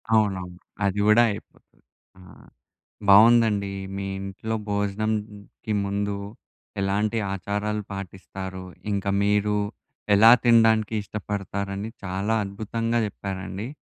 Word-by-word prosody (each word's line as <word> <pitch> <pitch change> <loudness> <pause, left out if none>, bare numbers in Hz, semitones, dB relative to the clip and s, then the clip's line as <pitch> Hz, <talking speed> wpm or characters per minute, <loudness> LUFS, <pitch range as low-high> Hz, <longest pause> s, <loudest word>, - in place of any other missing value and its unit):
అవునవును. 95 -5 0 0.3
అది 100 +1 0
కూడా 110 +3 +6
అయిపోతది. 100 - -12 0.4
ఆ! - - -15 0.9
బాగుందండి 105 -1 +6 0.2
మీ 100 - -3 0.2
ఇంట్లో 100 +3 -4
భోజనాంకి 105 +1 -3
ముందు, 100 0 -1 0.7
ఎలాంటి 105 +3 0 0.2
ఆచారాలు 105 +2 -2
పాటిస్తారో, 95 0 -7 0.3
ఇంక 100 -1 -2 0.2
మీరు 105 0 +2 0.6
ఎలా 110 +3 +8
తినడానికి 115 -2 +4
ఇష్టపడతారని 100 0 -4 0.2
చాలా 100 +4 -1
అద్భుతంగా 115 +4 -2
చెప్పారండి. 95 +1 -6
100 Hz, 90 wpm, -25 LUFS, 100-110 Hz, 0.9 s, ఎలా